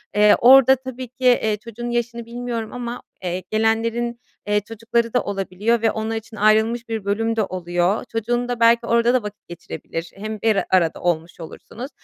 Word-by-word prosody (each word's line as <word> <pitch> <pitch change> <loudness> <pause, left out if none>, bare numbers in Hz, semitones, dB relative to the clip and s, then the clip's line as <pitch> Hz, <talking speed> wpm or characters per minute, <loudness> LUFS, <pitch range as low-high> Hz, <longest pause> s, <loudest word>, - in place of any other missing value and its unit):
Eee, 210 0 +6
orada 265 +1 +7
tabii 260 -1 -7
ki, 255 +2 -7
eee, 220 -4 +3
çocuğunun 230 +2 -7
yaşını 235 -1 -2
bilmiyorum 235 -1 -5
ama, 245 -1 -5 0.2
eee, 180 0 -3
gelenlerin, 230 +2 0 0.3
eee, 210 0 +2
çocukları 230 +2 -2
da 250 - +3
olabiliyor 200 +3 -1
ve 225 -1 +3
onlar 220 +1 -3
için 220 0 -7
ayrılmış 220 +3 +2
bir 220 -3 -3
bölüm 225 +3 0
de 220 - +1
oluyor. 175 +1 -1
Çocuğun 240 +2 -1
da 245 -1 -3
belki 235 0 +4
orada 235 +1 +3
da 255 -3 +2
vakit 210 0 -9
geçirebilir. 170 -1 -7
Hem 215 +1 -6
bir 220 -2 +2
arada 170 -4 +2
olmuş 170 -1 -2
olursunuz 230 - -9
225 Hz, 175 wpm, -21 LUFS, 205-235 Hz, 0.3 s, orada